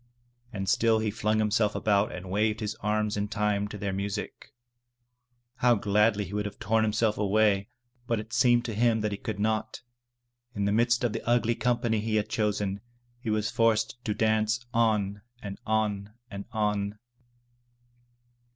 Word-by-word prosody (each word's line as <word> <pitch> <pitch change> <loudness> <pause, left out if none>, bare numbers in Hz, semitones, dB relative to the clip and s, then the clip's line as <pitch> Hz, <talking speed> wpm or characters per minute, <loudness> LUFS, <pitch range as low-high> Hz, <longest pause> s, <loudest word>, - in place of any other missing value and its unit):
And 95 -3 -4
still 115 +3 +3
he 110 -1 -1
flung 110 0 0
"himself 105 -1 +1
about 100 -1 +2
and 90 0 -7
waved 105 +2 +1
his 105 -2 -2
arms 105 0 0
in 105 0 -1
time 105 -1 0
to 105 - -7
their 100 -1 -3
music. 100 +2 -5 1.1
How 125 -1 +4
gladly 105 0 +2
he 95 - -9
would 105 0 -1
have 105 - -9
torn 110 +1 +1
himself 110 0 +1
away, 105 0 +2 0.4
but 115 -2 0
it 110 +1 -9
seemed 120 -1 +4
to 115 - -3
him 115 +1 +2
that 105 0 -1
he 100 - -3
could 105 -3 -5
not. 110 +1 -1 0.7
In 100 -1 -1
the 100 - +1
midst 120 +3 +2
of 120 -3 +1
the - - -3
ugly 120 -1 +3
company 120 -2 0
he 110 +1 -1
had 105 0 0
chosen, 105 -3 -1 0.4
he 120 -2 -5
was 110 +1 0
forced 115 0 +1
to 105 - -1
dance 110 +2 +1
on 105 -3 +1 0.2
and 100 -1 -6
on 105 -2 0 0.2
and 100 0 -6
on. 105 -2 -1
105 Hz, 170 wpm, -28 LUFS, 105-115 Hz, 1.1 s, How